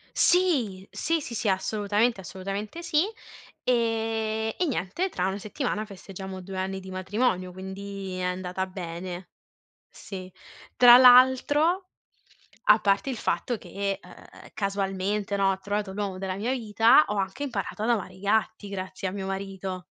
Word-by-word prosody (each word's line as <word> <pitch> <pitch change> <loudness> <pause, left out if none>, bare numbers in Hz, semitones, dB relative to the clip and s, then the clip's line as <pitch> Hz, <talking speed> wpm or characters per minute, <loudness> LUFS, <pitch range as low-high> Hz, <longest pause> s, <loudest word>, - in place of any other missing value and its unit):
Sì! 255 - +2
Sì, 330 0 0
sì, 245 - -7
sì, 210 - 0
assolutamente 205 +3 +1
assolutamente 195 - -5
sì. 330 -1 +2 0.6
Ehm, 225 -2 0
e 360 - +1
niente, 250 - -1
tra 180 - -1
una 195 +1 -2
settimana 215 0 -3
festeggiamo 190 -1 -8
2 190 +1 -7
anni 190 +1 -2
di 190 - -10
matrimonio, 185 0 -1
quindi 190 0 -6
è 180 - -3
andata 180 +1 -2
bene. 180 0 -6 0.6
Sì, 185 -2 -9 0.5
tra 245 -1 +10
l'altro, 260 +8 +6 0.8
a 210 - +7
parte 200 +5 +2
il 255 - -3
fatto 240 +2 -1
che, 200 -1 -3
ehm, 180 - -14 0.3
casualmente, 200 0 -1
no, 195 -1 +3
ho 190 - -4
trovato 205 0 -3
l'uomo 195 -2 -3
della 190 -1 -3
mia 225 +6 -1
vita, 225 +3 +5
ho 210 - -2
anche 195 +7 -2
imparato 215 -4 -4
ad 235 - +1
amare 205 -5 -1
i 185 - -15
gatti 215 0 0
grazie 190 -1 -4
a - - -3
mio 195 -1 -4
marito. 195 -1 -4
200 Hz, 150 wpm, -27 LUFS, 190-225 Hz, 0.8 s, tra